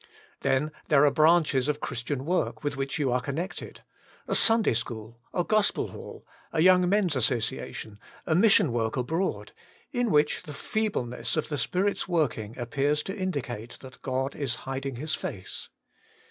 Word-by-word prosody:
Then 140 +3 +1 0.2
there 150 -1 +5
are 145 - +5
branches 155 -3 +4
of 150 0 0
Christian 130 +2 -3
work 180 -1 -1
with 145 -1 -1
which 135 0 -2
you 140 -4 +1
are 125 0 +1
connected 160 +9 -5 0.2
— - - -28
a - - -1
Sunday 225 - +4
school, 115 0 -4
a 175 - 0
gospel 215 +2 +1
hall, - - -10 0.3
a 160 - -1
young 180 +1 +6
men's 195 -6 +2
association, 115 -3 -1 0.3
a 160 - +1
mission 185 - +5
work 115 0 -1
abroad 160 +10 -1 0.2
— - - -32
in 245 -4 0
which 150 -4 +3
the 150 - -9
feebleness 180 - -2
of 155 - -1
the 150 - -1
Spirit's 195 +3 0
working 125 - -1
appears 140 +5 0
to 195 - -5
indicate 130 - -4
that 130 -1 -12
God 130 +1 -2
is 135 -5 -1
hiding 135 0 -3
His 155 +6 -2
face. - - -5
145 Hz, 165 wpm, -27 LUFS, 125-175 Hz, 0.3 s, young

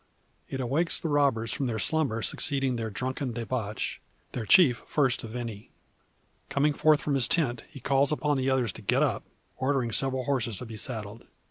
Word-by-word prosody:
It 135 - -4
awakes 140 +7 0
the 165 - -3
robbers 135 -6 +2
from 135 - -1
the 110 -2 -2
slumber 135 -5 0
succeeding 135 -3 +1
their 115 -1 -3
drunken 130 +3 -3
debauch; 115 -2 -3 0.3
their 115 -4 -4
chief 150 -11 +6
first 135 -5 +1
of 115 0 -7
any. 115 -4 -6 0.8
Coming 145 +1 +2
forth 155 +1 +4
from 145 - 0
his 135 -3 +2
tent, 120 -9 0
he 140 - -11
calls 135 +2 +2
upon 150 -1 +1
the 130 0 0
others 130 -5 +1
to - - -10
get 100 - +2
up - - 0 0.3
ordering 130 -3 0
several 130 +2 +1
horses 120 -6 -1
to 125 - -6
be 115 -1 -8
saddled. 110 -1 -5
130 Hz, 185 wpm, -28 LUFS, 115-140 Hz, 0.8 s, chief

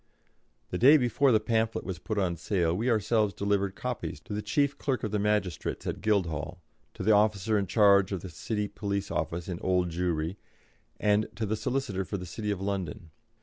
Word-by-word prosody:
The 90 - -2
day 140 +6 +8
before 130 +1 +2
the 110 - +5
pamphlet 110 +1 0
was 95 -4 -4
put 110 +4 -4
on 90 -4 +1
sale 85 -1 0
we 115 +7 0
ourselves 110 -2 +2
delivered 100 -1 0
copies 125 -1 -4
to - - -8
the 105 - -2
Chief 140 +7 +1
Clerk 135 -3 -1
of 105 - -2
the 105 - 0
Magistrates 100 -6 -1
at - - -3
Guildhall, 90 -5 0 0.4
to - - -5
the 110 - +4
officer 105 0 +3
in 100 -2 +1
charge 100 -1 +5
at 95 -3 -2
the 95 - -7
City 105 +6 -3
Police 100 -1 -3
Office 80 +2 -2
in 90 -2 -4
Old 90 -2 +1
Jewry, 85 +1 -1 0.6
and 105 +1 +2
to 115 - -2
the 110 +1 -1
Solicitor 110 -3 -2
for 100 - -4
the 90 - -6
City 105 +4 -5
of 100 -3 -1
London. 95 -2 -4
100 Hz, 195 wpm, -29 LUFS, 90-110 Hz, 0.6 s, day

